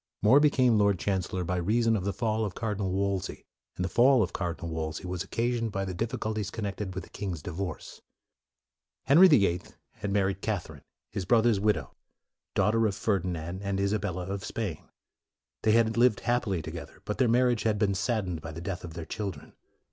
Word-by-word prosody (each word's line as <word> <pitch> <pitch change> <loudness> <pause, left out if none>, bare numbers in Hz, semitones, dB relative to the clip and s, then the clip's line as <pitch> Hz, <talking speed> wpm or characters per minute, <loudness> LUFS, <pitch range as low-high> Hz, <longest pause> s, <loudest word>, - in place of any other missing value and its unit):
More 115 +7 +7
became 130 -6 +4
Lord 100 -2 +3
Chancellor 95 -1 -1
by 90 +1 -1
rea 105 +7 +1
son 115 0 +3
of 95 -3 -2
the 100 - +1
fall 110 -1 -1
of 100 -4 -3
Cardinal 105 -4 -2
Wolsey; 100 0 -2 0.3
and 90 - -2
the - - 0
fall 120 +5 +5
of 95 - -4
Cardinal 85 -2 -3
Wolsey 80 +2 -4
was 90 0 -3
occasioned 115 +2 -1
by 95 -1 -2
the 95 - -4
difficulties 110 0 -2
connected 100 -3 -4
with 95 - -4
the - - -14
king's 90 -7 -5
divorce. 85 -1 -5 1.0
Henry 170 +7 +7
the 145 - +5
Eighth 90 -1 -3
had 100 - -5
married 100 -1 +1
Cath 105 -5 -2
erine, 75 -3 -13 0.3
his 95 - -3
brother's 115 0 +4
widow, 100 -10 0 0.6
daughter 115 +1 +3
of 100 - -2
Ferdinand 95 -4 -2
and 100 -1 -2
Isabella 100 -3 -1
of 100 0 -4
Spain. 95 -8 -4 0.7
They 110 - +3
had 115 -1 +3
lived 120 -2 +4
happily 110 -8 0
together, 80 -2 -8
but 105 - -3
their 125 -3 +4
mar 120 +2 +4
riage 120 -3 +2
had 110 -2 +1
been 100 -2 +2
saddened 95 -4 -1
by 80 0 -7
the 80 - -6
death 90 +1 -5
of 85 -2 -8
their 85 -2 -5
children. 95 -8 -6
100 Hz, 195 wpm, -28 LUFS, 90-110 Hz, 1.0 s, More